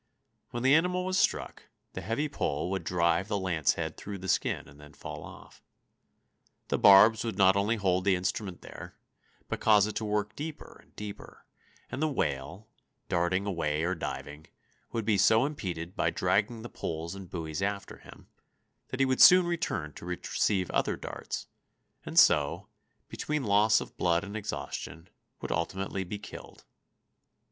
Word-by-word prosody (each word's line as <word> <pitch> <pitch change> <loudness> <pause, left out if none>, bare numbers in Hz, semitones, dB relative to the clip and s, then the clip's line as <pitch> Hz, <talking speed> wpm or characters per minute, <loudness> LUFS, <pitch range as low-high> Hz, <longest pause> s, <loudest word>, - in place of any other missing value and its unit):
When 120 0 -4
the 135 +1 +5
animal 180 +3 +2
was 185 +1 +1
struck, - - -1 0.3
the 95 - -5
heavy 115 - -1
pole 90 - -2
would 95 -3 -2
drive 85 +1 +1
the 105 - -1
lancehead 90 -6 0
through 100 -1 -6
the 95 0 -8
skin - - 0
and 70 +2 -16
then 75 -1 -14
fall - - -8
off. - - -13 1.1
The - - 0
barbs 105 +3 +7
would 115 -4 -4
not 95 -1 +5
only 100 +3 +1
hold 95 -4 +1
the 95 -1 +3
instrument 95 0 -3
there, - - -10 0.5
but - - -3
cause 105 -2 +5
it 110 - -5
to - - -3
work 105 0 -1
deeper 150 +1 -7
and - - -29
deeper, 105 -1 -9 0.5
and 135 - -4
the 155 - +3
whale, 80 - -3 0.4
darting 90 +3 +1
away 80 -5 -1
or 90 +2 +1
diving, 75 -3 -6 0.4
would 115 -2 -3
be 105 -3 +2
so 110 +5 +5
impeded 90 - -5
by - - +1
dragging 110 +3 0
the - - -5
poles 85 -5 -5
and 95 -2 -9
buoys 80 -1 -4
after 100 0 -3
him, - - -15 0.6
that 130 - -6
he 135 - +4
would 130 -1 +1
soon 180 0 +9
return 160 - -2
to - - -11
receive 90 +1 -1
other - - +1
darts, - - -6 0.6
and - - -6
so, 80 +7 +4 0.4
between 150 -2 -3
loss 105 0 +4
of - - -9
blood 85 0 +2
and 100 +1 -7
exhaustion, 95 -4 -6 0.3
would - - -3
ultimately 95 +3 -2
be 100 +3 -5
killed. 105 - -11
100 Hz, 165 wpm, -29 LUFS, 85-110 Hz, 1.1 s, soon